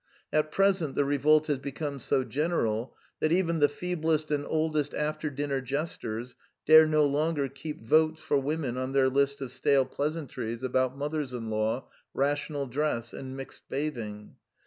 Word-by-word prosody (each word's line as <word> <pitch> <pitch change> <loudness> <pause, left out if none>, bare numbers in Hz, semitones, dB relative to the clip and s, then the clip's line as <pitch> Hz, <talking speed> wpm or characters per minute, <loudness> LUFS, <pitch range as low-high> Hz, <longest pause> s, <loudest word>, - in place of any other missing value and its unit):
At 155 0 +2
present 190 -7 +2
the 145 - +2
revolt 150 +2 +4
has 145 -4 0
become 140 +1 -4
so 130 +2 +1
general 130 -6 -1 0.2
that 155 - +1
even 170 -2 +2
the 145 - +5
feeblest 160 -2 -1
and 145 -1 +1
old 155 0 0
est 145 -1 0
after 155 +1 -1
dinner 140 -1 -2
jesters 125 -4 -4 0.3
dare 155 +1 +8
no 155 -1 +4
longer 145 0 +1
keep 140 +1 -8
Votes 155 +5 +3
for 145 - +1
Women 140 -3 -2
on 130 +1 -3
their 135 -1 +4
list 140 +1 +1
of 125 - -6
stale 135 +1 +3
pleasantries 135 -7 -3
about 130 +1 +1
mothers 145 -2 -2
in 115 -2 -4
law, 110 +4 -1 0.3
rational 145 +1 0
dress, 125 -3 -2
and 130 0 -7
mixed 135 - -10
bathing. 115 -8 -4
145 Hz, 165 wpm, -28 LUFS, 130-155 Hz, 0.3 s, dare